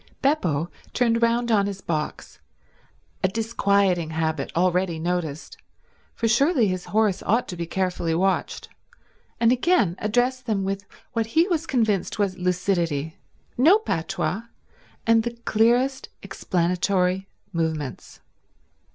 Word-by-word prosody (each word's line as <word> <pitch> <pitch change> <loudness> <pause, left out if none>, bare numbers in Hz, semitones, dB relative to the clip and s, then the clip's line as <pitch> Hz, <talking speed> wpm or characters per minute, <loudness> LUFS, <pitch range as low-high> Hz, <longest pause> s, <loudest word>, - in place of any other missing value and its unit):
Beppo 175 - +1 0.2
turned 230 -1 +2
round 235 +1 +2
on 200 -2 +3
his 200 -1 -5
box—a 165 +2 -6
disquieting 200 -5 +1
habit 160 -2 -2
already 180 0 +1
noticed, 160 -3 -3 0.6
for 230 - 0
surely 255 +1 +3
his 185 -1 -3
horse 205 0 +1
ought 230 +4 +1
to 180 - -4
be 170 -1 -4
carefully 180 -2 -1
watched—and 195 +5 -2
again 255 - +2
addressed 245 +4 0
them 205 -3 0
with 195 +1 -3 0.3
what 225 -2 0
he 335 +3 +5
was 330 -2 -1
convinced 220 - 0
was 200 -3 0
lucidity—no 180 - 0
patois, 195 - -2 0.6
and 225 0 +5
the 235 +1 -5
clearest 245 +5 +2
explanatory 180 +1 0 0.3
movements. 160 -5 -3
195 Hz, 110 wpm, -24 LUFS, 175-230 Hz, 0.6 s, he